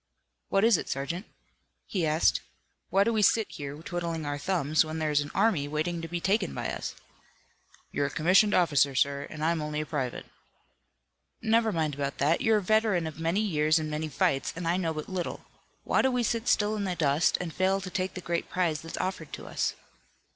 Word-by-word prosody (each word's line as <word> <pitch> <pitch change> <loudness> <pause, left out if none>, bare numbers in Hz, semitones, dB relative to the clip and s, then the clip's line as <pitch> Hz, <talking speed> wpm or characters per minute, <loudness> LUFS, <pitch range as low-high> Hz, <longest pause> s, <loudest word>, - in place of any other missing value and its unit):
"What 195 - +2
is 225 -4 +6
it, - - -6
sergeant?" 165 +9 -3 0.6
he 175 -5 -1
asked. 155 +2 +3 0.5
"Why 195 +1 +4
do 230 +3 +1
we 215 - +2
sit 220 +1 +3
here, 140 -1 -6
twiddling 170 -3 -3
our 145 0 -3
thumbs 155 -3 +2
when 155 0 -5
there 155 -1 0
is 145 0 +3
an 145 - -5
army 170 -11 +2
waiting 160 +3 -2
to 165 - -5
be 175 +1 -3
taken 190 +1 0
by - - -2
us?" - - -5 1.0
"You're 140 - 0
a - - -4
commissioned 185 +8 +4
officer, 145 -5 +3
sir, 140 +2 +1
and 155 0 -4
I'm 165 -1 +1
only 150 0 -3
a - - -4
private." 135 -6 -3 1.2
"Never 225 0 +3
mind 160 -5 0
about 140 0 -3
that. 155 +4 +2
You're 225 -1 +4
a 205 - -2
veteran 215 -4 +2
of 160 0 -6
many 165 +5 +1
years 155 -6 +2
and 155 -1 -2
many 155 +1 -2
fights, 135 -1 +1
and 165 0 -4
I 170 - +2
know 175 -3 0
but 155 -1 -5
little. 185 -2 -4 0.4
Why - - +2
do 265 - +3
we 250 -1 0
sit 230 +1 -1
still 210 +1 +2
in 205 -1 -2
the 185 -2 -1
dust 150 0 +2
and 170 -3 -4
fail 190 +1 +2
to 190 -1 -6
take 185 0 -2
the 185 - -5
great 170 -1 -2
prize 170 -5 0
that's 165 - -7
offered 185 -5 -3
to - - -7
us?" - - -1
165 Hz, 210 wpm, -28 LUFS, 150-190 Hz, 1.2 s, is